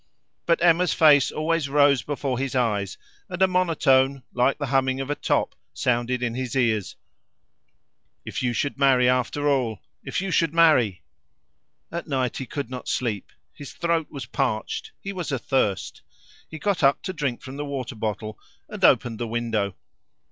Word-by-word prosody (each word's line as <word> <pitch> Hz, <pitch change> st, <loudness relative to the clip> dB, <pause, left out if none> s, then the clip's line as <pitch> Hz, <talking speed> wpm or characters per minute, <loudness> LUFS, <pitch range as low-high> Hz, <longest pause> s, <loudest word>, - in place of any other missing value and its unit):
But 170 Hz, 0 st, +2 dB
Emma's 175 Hz, +1 st, +4 dB
face 145 Hz, -4 st, +6 dB
always 155 Hz, -1 st, -1 dB
rose 145 Hz, -2 st, +4 dB
before 140 Hz, -3 st, -3 dB
his 135 Hz, 0 st, -3 dB
eyes, 105 Hz, -6 st, 0 dB, 0.3 s
and 180 Hz, -1 st, -5 dB
a 190 Hz, -, +5 dB
monotone, 140 Hz, -7 st, +2 dB
like 125 Hz, +2 st, +2 dB
the 145 Hz, -, -3 dB
humming 130 Hz, 0 st, +1 dB
of 135 Hz, +1 st, -3 dB
a -, -, 0 dB
top, -, -, 0 dB, 0.2 s
sounded 125 Hz, 0 st, 0 dB
in 120 Hz, -2 st, -1 dB
his 130 Hz, +1 st, -4 dB
ears, 110 Hz, -6 st, 0 dB, 1.3 s
"If -, -, -4 dB
you 125 Hz, -1 st, +1 dB
should 140 Hz, +4 st, -2 dB
marry 130 Hz, -3 st, +4 dB
after 125 Hz, +3 st, +1 dB
all! 125 Hz, -7 st, +1 dB, 0.2 s
If -, -, -3 dB
you 190 Hz, 0 st, -3 dB
should 165 Hz, -3 st, +1 dB
marry!" 130 Hz, -, +4 dB, 0.9 s
At 170 Hz, +1 st, -5 dB
night 130 Hz, -4 st, -1 dB
he 130 Hz, -, -5 dB
could 140 Hz, -4 st, -4 dB
not 125 Hz, -1 st, -7 dB
sleep; 110 Hz, -6 st, -2 dB, 0.2 s
his 145 Hz, -, -10 dB
throat 170 Hz, -2 st, 0 dB
was 140 Hz, -5 st, -7 dB
parched; 120 Hz, -4 st, -2 dB
he 200 Hz, -, -6 dB
was 180 Hz, -5 st, -4 dB
athirst. 130 Hz, -6 st, -1 dB, 0.5 s
He 160 Hz, -, -7 dB
got 200 Hz, +2 st, -1 dB
up 140 Hz, -1 st, +3 dB
to 185 Hz, -, -4 dB
drink 140 Hz, -7 st, -3 dB
from 130 Hz, +1 st, -8 dB
the 145 Hz, -, -3 dB
water 135 Hz, -3 st, -4 dB
bottle 110 Hz, -1 st, -4 dB, 0.3 s
and -, -, -8 dB
opened 115 Hz, -3 st, +4 dB
the 120 Hz, -, -2 dB
window. 110 Hz, -4 st, -1 dB
135 Hz, 170 wpm, -24 LUFS, 120-150 Hz, 1.3 s, face